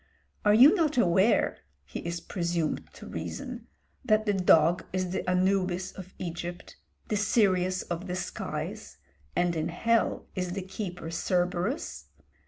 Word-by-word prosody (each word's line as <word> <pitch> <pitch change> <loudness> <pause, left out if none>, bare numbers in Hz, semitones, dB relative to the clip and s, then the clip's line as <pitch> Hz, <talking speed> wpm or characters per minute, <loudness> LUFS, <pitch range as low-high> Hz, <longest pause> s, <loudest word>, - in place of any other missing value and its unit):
"Are 210 - +5
you 265 - +9
not 320 -7 +1
aware," 190 0 +3 0.3
he - - -6
is 170 0 -4
presumed 170 -3 -2
to - - -11
reason, - - -6 0.4
"that 215 -3 +3
the 205 - +2
dog 175 -2 +4
is 185 -1 -1
the 190 - -2
Anubis 185 0 +1
of 185 -1 -11
Egypt, 175 0 -6 0.3
the 215 - +1
Sirius 185 -3 +2
of 175 +2 -5
the 180 - -2
skies; 185 - -5 0.4
and 175 -1 +2
in 160 0 -1
hell 230 +7 +1
is 180 -2 -2
the 195 0 -3
keeper 180 -3 -6
Cerberus?" 180 - -1
185 Hz, 140 wpm, -28 LUFS, 175-205 Hz, 0.4 s, you